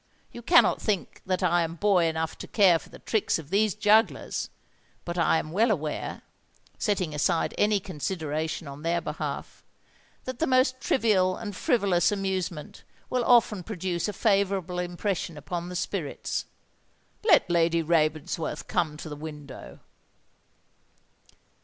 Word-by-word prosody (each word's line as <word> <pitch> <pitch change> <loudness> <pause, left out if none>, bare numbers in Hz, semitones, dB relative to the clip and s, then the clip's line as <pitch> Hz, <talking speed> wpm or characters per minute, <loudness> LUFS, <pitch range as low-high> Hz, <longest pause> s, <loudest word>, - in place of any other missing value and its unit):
You 240 - -9
cannot 335 +8 +4
think 205 -5 -2
that 185 0 0
I 175 -1 +3
am 165 0 -2
boy 190 -1 +3
enough 160 0 -2
to - - -7
care 185 -6 +4
for - - -16
the - - -12
tricks 220 -3 0
of 160 -1 -10
these 210 0 +2
jugglers; 215 +1 +2 0.6
but 170 - -4
I 170 -1 +3
am 155 - -4
well 220 +7 +3
aware—setting 180 +1 -4
aside 150 +2 +1
any 210 0 +2
consideration 160 -3 -3
on 140 +1 -9
their 170 +2 0
behalf—that 200 +9 -8
the 325 - +1
most 255 0 +2
trivial 190 -7 +2
and 205 -3 -6
frivolous 185 -5 +2
amusement 190 -5 -3 0.3
will 250 -1 +1
often 230 -5 +4
produce 180 -3 -3
a 210 - -3
favourable 195 -4 +1
impression 175 -2 -3
upon 170 +4 -5
the 180 - -6
spirits. 175 -4 -3 0.8
Let 385 -8 +5
Lady 170 -1 +2
Ravensworth 155 -1 0
come 160 -4 -1
to 155 - -8
the 150 - -6
window." 145 - -9
180 Hz, 135 wpm, -27 LUFS, 160-205 Hz, 0.8 s, Let